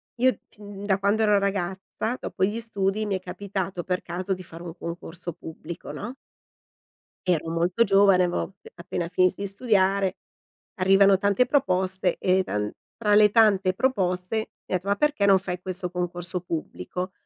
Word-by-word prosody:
io 255 +2 +2
fin 205 -2 -10
da 195 -2 +3
quando 200 +3 +1
ero 210 -1 +4
ragazza, 195 +4 -2
dopo 185 - -3
gli 210 +4 -2
studi, 215 -2 -1
mi 200 -2 -1
è - - -2
capitato 190 -1 -4
per 180 +1 -1
caso 180 +3 -3
di 185 0 -7
fare 170 0 -11
un 170 -2 -7
concorso 170 0 -7
pubblico, 165 +2 -8
no? 240 - -6 1.1
Ero 165 -3 +1
molto 175 +7 +2
giovane, 195 -2 +5
avevo 175 0 0
ap 195 - -7 0.2
appena 170 0 -4
finito 185 +1 +3
di 200 - -1
studiare, 195 -2 +1 0.6
arrivano 195 +1 +5
tante 200 +4 +3
proposte 190 -9 +1
e 185 +1 +3
taN 105 - -2 0.3
tra 210 -2 +2
le 210 0 +7
tante 200 -4 +4
proposte 185 -5 0
mi 220 - -1 0.3
han - - +5
detto: 180 +2 -5
"Ma 200 - +2
perché 290 -6 +2
non 195 -1 +6
fai 180 -1 -5
questo 185 -1 -4
concorso 180 0 -3
pubblico?". 180 +2 -5
190 Hz, 165 wpm, -25 LUFS, 180-205 Hz, 1.1 s, le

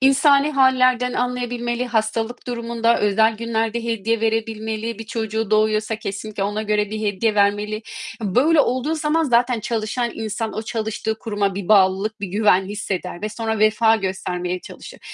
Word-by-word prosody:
İnsani 275 +2 +4
hâllerden 255 -2 +3
anlayabilmeli, 245 0 -2
hastalık 225 +1 -2
durumunda, 235 -1 0
özel 220 +2 +3
günlerde 230 0 -2
hediye 230 -1 -1
verebilmeli. 220 0 -2
Bir 225 - -6
çocuğu 220 -1 -3
doğuyorsa 215 0 +2
kesinlikle 210 -1 -5
ona 210 +2 -1
göre 210 -1 0
bir 215 0 -4
hediye 210 +1 0
vermeli. 210 +1 +1 0.4
Böyle 280 - +3
olduğu 260 +5 0
zaman 315 +1 +1
zaten 240 -2 +2
çalışan 230 +2 -2
insan 220 0 -3
o 220 - -2
çalıştığı 220 0 -3
kuruma 205 -4 -1
bir 195 -2 -5
bağlılık, 200 +1 +3
bir 200 - -2
güven 195 -1 +3
hisseder 190 -3 -4
ve 215 - -1
sonra 220 0 -3
vefa 220 +1 +4
göstermeye 180 -2 -3
çalışır. - - -11
220 Hz, 145 wpm, -21 LUFS, 210-235 Hz, 0.4 s, İnsani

